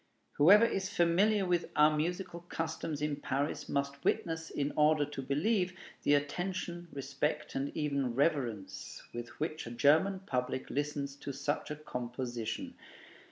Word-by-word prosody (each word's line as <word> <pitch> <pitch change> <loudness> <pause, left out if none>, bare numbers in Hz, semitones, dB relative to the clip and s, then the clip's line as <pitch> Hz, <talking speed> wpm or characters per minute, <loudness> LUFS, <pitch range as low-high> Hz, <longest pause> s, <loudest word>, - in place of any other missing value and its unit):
Whoever 200 +10 +8
is 190 -4 -1
familiar 195 +3 +3
with 175 -1 +1
our 150 0 +6
musical 170 +3 -2
customs 160 -3 -3
in 150 -1 0
Paris 140 +1 -2
must 140 0 -1
witness, 165 -1 0
in 145 0 -1
order 150 0 +4
to 145 -1 -6
believe, 180 - +1 0.2
the 145 - +4
attention, 175 +3 -2
respect, 140 +2 -2
and 135 +1 -2
even 140 -5 0
reverence 125 - -1
with 120 0 -5
which 155 -3 -3
a - - -6
German 160 +10 +4
public 130 -6 -2
listens 145 -1 -2
to 140 - -5
such 140 +2 -2
a 150 - -3
composition. 120 -4 -4
150 Hz, 140 wpm, -33 LUFS, 140-170 Hz, 0.2 s, Whoever